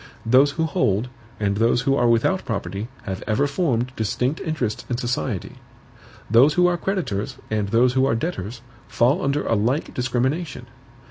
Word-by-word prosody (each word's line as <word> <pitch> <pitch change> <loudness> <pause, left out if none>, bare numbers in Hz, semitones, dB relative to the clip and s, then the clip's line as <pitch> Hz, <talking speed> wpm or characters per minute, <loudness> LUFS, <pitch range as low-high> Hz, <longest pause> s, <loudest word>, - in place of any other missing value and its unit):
Those 130 +5 +5
who 160 +1 0
hold 125 - 0 0.3
and 100 -1 0
those 115 +2 +3
who 135 +1 +2
are 120 -3 +2
without 120 +11 +2
property 100 -1 -4 0.2
have 95 -2 -5
ever 115 +6 +2
formed 135 -5 0
distinct 125 +7 -1
interests 140 -10 -2
in 120 - -1
society. 120 -4 -3 0.7
Those 125 +8 +5
who 180 - +4
are 180 0 +3
creditors, 170 - -2
and 105 -2 0
those 120 +3 +3
who 130 +1 +3
are 115 - +1
debtors, 115 - -4 0.3
fall 130 +10 +2
under 140 +2 0
a - - +1
like 120 +8 0
discrimination. 125 +3 -1
125 Hz, 160 wpm, -22 LUFS, 110-145 Hz, 0.7 s, Those